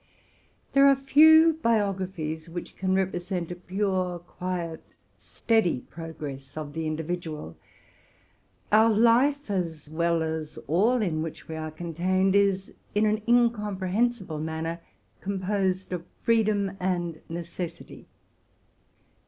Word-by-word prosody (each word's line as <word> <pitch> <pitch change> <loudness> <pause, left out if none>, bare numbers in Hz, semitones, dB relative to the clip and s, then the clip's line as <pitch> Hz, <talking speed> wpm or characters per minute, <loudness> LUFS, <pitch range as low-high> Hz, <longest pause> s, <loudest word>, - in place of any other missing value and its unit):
There 275 0 +7
are 275 - +6
few 315 +4 +6
biographies 190 - -1
which 175 +1 -7
can 185 0 0
represent 180 -2 -2
a - - -4
pure, 185 0 -1
quiet, 175 -1 -5 0.6
teady 220 - +3
progress 145 -4 -8
of 150 -2 -5
the 160 0 -3
individual. 155 - -4 1.2
Our 220 +2 +6
life, 240 +4 +3
as 165 -6 -3
well 170 0 +1
as 160 -1 -4
that - - -11
whole 215 - +2
in 160 -5 -1
which 160 -1 -6
we 160 - -5
are 155 0 -4
contained, 175 +4 0
is, 195 -1 +2 0.2
in 210 +1 +3
an 215 +1 +1
incomprehensible 210 -5 +1
manner, 160 +2 -3 0.4
composed 190 -1 -1
of 175 -2 -3 0.2
freedom 210 -4 +2
and 175 -3 -2
necessity. 170 0 -7
185 Hz, 115 wpm, -27 LUFS, 165-210 Hz, 1.2 s, There